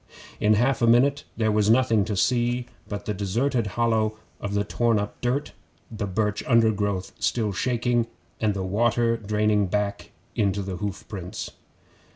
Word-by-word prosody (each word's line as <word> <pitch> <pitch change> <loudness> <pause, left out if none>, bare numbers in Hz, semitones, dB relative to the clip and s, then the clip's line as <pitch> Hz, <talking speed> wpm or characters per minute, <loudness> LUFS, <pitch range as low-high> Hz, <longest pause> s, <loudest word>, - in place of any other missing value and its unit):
In 105 +1 +4
half 120 +5 +2
a 115 - +4
minute 140 +5 +4
there 110 -1 +2
was 105 0 +2
nothing 115 -3 +4
to 105 -2 -3
see 120 +2 +1 0.2
but 105 -1 -5
the 105 - -1
deserted 115 +5 0
hollow 110 -2 +1 0.2
of 100 0 -4
the 100 - +2
torn 115 +2 +1
up 105 0 -4
dirt, 125 +4 -1 0.4
the 110 -2 -3
birch 105 +2 -1
undergrowth 105 -6 +2
still 110 -4 0
shaking, 120 +2 +1 0.3
and 105 -2 +1
the 95 - -2
water 115 +4 +2
draining 105 -2 +1
back 100 +1 -2 0.3
into 100 -1 +1
the 95 -1 -4
hoof 100 0 -5
prints. 90 -4 -6
110 Hz, 160 wpm, -25 LUFS, 100-120 Hz, 0.4 s, In